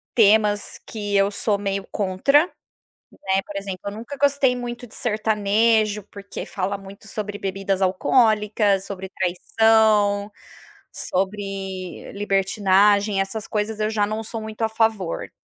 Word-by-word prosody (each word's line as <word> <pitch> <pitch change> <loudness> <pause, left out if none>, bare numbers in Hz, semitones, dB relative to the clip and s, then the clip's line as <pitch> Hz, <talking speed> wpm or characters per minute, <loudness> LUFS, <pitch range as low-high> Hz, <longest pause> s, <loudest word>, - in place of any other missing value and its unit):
temas 210 -2 +3
que 205 -2 -3
eu 195 0 +4
sou 205 0 0
meio 195 -1 -3
contra, 210 - +3 0.7
né. 190 0 0
Por 200 - -8
exemplo, 195 -2 -5
eu 200 - -3
nunca 235 +7 -7
gostei 280 -2 +3
muito 245 0 -6
de - - -12
sertanejo, 215 -1 +1
porque 200 0 -7
fala 195 +1 -2
muito 200 +2 -12
sobre 205 -1 -5
bebidas 195 0 -2
alcoólicas, 210 0 +2
sobre 190 -1 -7
traição, 205 +2 +2 0.6
sobre 195 -1 -4
libertinagem. 200 0 +2
Essas 195 +2 -3
coisas 210 0 -2
eu 215 +1 +1
já 210 -2 +1
não 215 +1 -3
sou 225 +1 -5
muito 220 +1 -7
a 220 - +3
favor. 220 -5 0
205 Hz, 130 wpm, -23 LUFS, 195-220 Hz, 0.7 s, eu